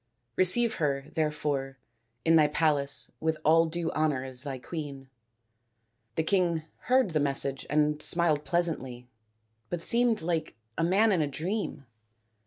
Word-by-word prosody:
Receive 220 Hz, +5 st, +2 dB
her, 140 Hz, -1 st, -1 dB
there 155 Hz, -1 st, +1 dB
fore, 135 Hz, -3 st, -3 dB, 0.5 s
in 165 Hz, -, +5 dB
thy 155 Hz, -2 st, +6 dB
palace 150 Hz, -2 st, +1 dB
with 160 Hz, 0 st, 0 dB
all 165 Hz, +2 st, +5 dB
due 165 Hz, 0 st, -3 dB
honour 150 Hz, -4 st, 0 dB
as 130 Hz, -1 st, -6 dB
thy 140 Hz, -2 st, -5 dB
queen." 140 Hz, -2 st, -7 dB, 1.0 s
The 160 Hz, -, +1 dB
king 170 Hz, -3 st, +1 dB, 0.3 s
heard 255 Hz, -6 st, +4 dB
the 155 Hz, -, +1 dB
message 140 Hz, -1 st, -1 dB
and 150 Hz, 0 st, +1 dB
smiled 160 Hz, -4 st, +2 dB
pleasantly, 140 Hz, -9 st, -2 dB, 0.6 s
but 175 Hz, -, -2 dB
seemed 235 Hz, -4 st, +2 dB
like 165 Hz, -2 st, -2 dB, 0.2 s
a -, -, 0 dB
man 200 Hz, +6 st, +4 dB
in 180 Hz, -5 st, +2 dB
a 150 Hz, -, +1 dB
dream. 160 Hz, 0 st, -3 dB
155 Hz, 145 wpm, -28 LUFS, 140-175 Hz, 1.0 s, thy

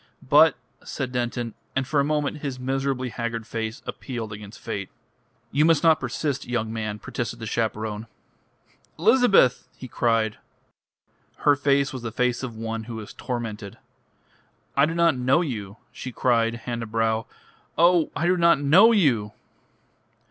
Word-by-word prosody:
"But -, -, +6 dB
" -, -, -30 dB
said 130 Hz, -1 st, -4 dB
Denton, 120 Hz, -2 st, -2 dB, 0.2 s
and 135 Hz, 0 st, 0 dB
for 145 Hz, 0 st, +1 dB
a -, -, +4 dB
moment 150 Hz, 0 st, -1 dB
his 140 Hz, -3 st, -5 dB
miserably 135 Hz, 0 st, -1 dB
haggard 115 Hz, 0 st, -4 dB
face 115 Hz, +3 st, -5 dB
appealed 115 Hz, -5 st, -5 dB
against 105 Hz, 0 st, -10 dB
fate. 100 Hz, -4 st, -5 dB, 0.6 s
"You 145 Hz, +3 st, +3 dB
must 160 Hz, -2 st, +4 dB
not 160 Hz, -1 st, +5 dB
persist, 145 Hz, -4 st, -3 dB
young 115 Hz, -2 st, -2 dB
man," 110 Hz, -2 st, -3 dB
protested 120 Hz, +2 st, -5 dB
the 115 Hz, -, -7 dB
chaperone. 110 Hz, -1 st, -2 dB, 0.9 s
"Elizabeth!" 200 Hz, -, +4 dB
he 130 Hz, -, -8 dB
cried. 115 Hz, -2 st, 0 dB, 1.1 s
Her 145 Hz, -, +6 dB
face 140 Hz, -1 st, +1 dB
was 130 Hz, -, -5 dB
the 115 Hz, -1 st, -5 dB
face 125 Hz, +1 st, 0 dB
of 125 Hz, -4 st, -5 dB
one 115 Hz, 0 st, -4 dB
who 115 Hz, -1 st, -6 dB
is 105 Hz, -, -9 dB
tormented. 110 Hz, -5 st, -5 dB, 1.0 s
"I 140 Hz, +2 st, +4 dB
do 165 Hz, -, -3 dB
not 170 Hz, -3 st, +3 dB
know 130 Hz, +5 st, +2 dB
you," 110 Hz, -, -5 dB
she 130 Hz, -, -7 dB
cried, 115 Hz, -1 st, +1 dB
hand 120 Hz, 0 st, -5 dB
to 115 Hz, -, -5 dB
brow. 110 Hz, 0 st, 0 dB, 0.5 s
"Oh, 170 Hz, 0 st, +4 dB
I 170 Hz, -, -1 dB
do 180 Hz, +1 st, +3 dB
not 170 Hz, -4 st, +4 dB
know 175 Hz, +11 st, +6 dB
you!" 125 Hz, -, +2 dB
125 Hz, 155 wpm, -24 LUFS, 115-145 Hz, 1.1 s, But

